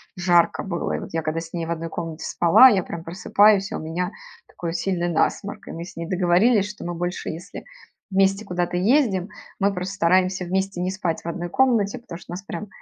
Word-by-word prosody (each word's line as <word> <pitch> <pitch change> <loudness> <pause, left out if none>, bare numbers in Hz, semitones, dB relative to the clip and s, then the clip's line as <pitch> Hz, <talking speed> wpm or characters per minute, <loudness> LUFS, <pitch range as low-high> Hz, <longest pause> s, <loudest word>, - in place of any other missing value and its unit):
жарко 175 -1 +3
было. 175 -4 -3
И - - -1
вот - - -8
я 165 - 0
когда 155 +1 -2
с 165 0 -9
ней 170 -2 -2
в 170 - -3
1 165 0 -3
комнате 165 -1 -5
спала, 175 +9 +6
я 195 -6 +2
прям 165 - -7
просыпаюсь, 195 +3 +3
и - - -3
у - - -3
меня 170 +3 -3 0.4
такой 170 -1 -5
сильный 175 -2 -1
насморк, 200 +5 -1
и - - -6
мы 170 - -6
с - - -12
ней 170 0 -5
договорились, 190 +4 +3
что 210 - -9
мы 175 0 -3
больше, 175 +2 -3
если 165 +2 -8 0.5
вместе 195 +2 +2
куда-то 175 -1 -2
ездим, 205 -2 +2 0.3
мы 200 +1 +3
просто 180 +1 -4
стараемся 185 +1 +2
вместе 190 0 -1
не 180 - 0
спать 185 -4 -2
в - - -8
1 175 +1 -4
комнате, 230 -4 +2
потому 235 -8 -9
что - - -13
у - - -4
нас 180 - -5
прям 205 +1 -6
180 Hz, 220 wpm, -23 LUFS, 170-195 Hz, 0.5 s, спала